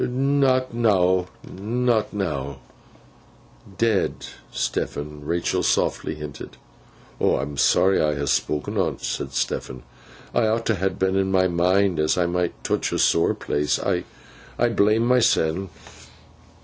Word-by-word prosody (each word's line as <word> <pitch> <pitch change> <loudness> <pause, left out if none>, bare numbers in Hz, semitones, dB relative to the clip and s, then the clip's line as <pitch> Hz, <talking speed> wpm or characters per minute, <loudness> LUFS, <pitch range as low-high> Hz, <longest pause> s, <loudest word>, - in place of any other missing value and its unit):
'Not 130 -1 +1
now, 95 -6 +2 0.2
not 115 +3 -1
now.' 70 -9 -3 1.2
'Dead, 110 -1 +2 0.4
Stephen,' 75 0 -3
Rachael 85 +3 -1
softly - - 0
hinted. 75 -4 -9 0.6
'I'm 75 +1 0
sooary 95 +7 +3
I 75 -1 +1
ha 70 0 -2
spok'n 75 +2 -1
on - - 0
't,' - - -19
said 70 - -3
Stephen, 65 +1 -3 0.5
'I 115 - +2
ought 115 +1 0
t' 110 - +2
hadn 95 0 -1
in 95 0 +1
my 95 -1 +3
mind 90 +1 +2
as 75 +3 +1
I 90 - +2
might 90 0 -2
touch - - -1
a - - -1
sore - - +3
place. 75 0 -1
I—I 65 - -3
blame 110 +1 +2
myseln. 95 -7 +2
95 Hz, 125 wpm, -23 LUFS, 75-110 Hz, 1.2 s, sooary